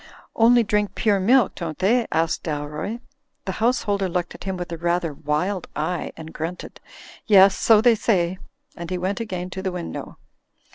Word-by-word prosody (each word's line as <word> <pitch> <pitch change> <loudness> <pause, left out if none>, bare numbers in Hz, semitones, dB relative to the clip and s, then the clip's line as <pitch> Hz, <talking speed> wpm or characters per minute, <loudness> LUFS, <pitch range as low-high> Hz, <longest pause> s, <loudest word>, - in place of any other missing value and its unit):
"Only 235 +1 +5
drink 210 -1 0
pure 205 -3 +2
milk, 235 +4 +4
don't 165 -4 -5
they?'* 230 +6 +2
asked 165 0 0
Dalroy. 150 +8 -4 0.4
The 190 - -2
householder 205 -5 +1
looked 175 0 -2
at - - -11
him 190 -1 -3
with 175 -1 -6
a 170 - -4
rather 170 -2 0
wild 155 +7 -2
eye 160 +3 -2
and 160 0 -9
grunted. 165 +3 -6 0.5
"Yes; 195 -2 +7
so 220 -2 +5
they 240 +1 +5
say," 185 -5 0 0.4
and 170 -1 -7
he 185 - -2
went 190 +2 -2
again 185 -5 -5
to 190 - -5
the 190 -1 -2
win 180 -1 -5
dow. - - -8
185 Hz, 180 wpm, -23 LUFS, 170-210 Hz, 0.5 s, Yes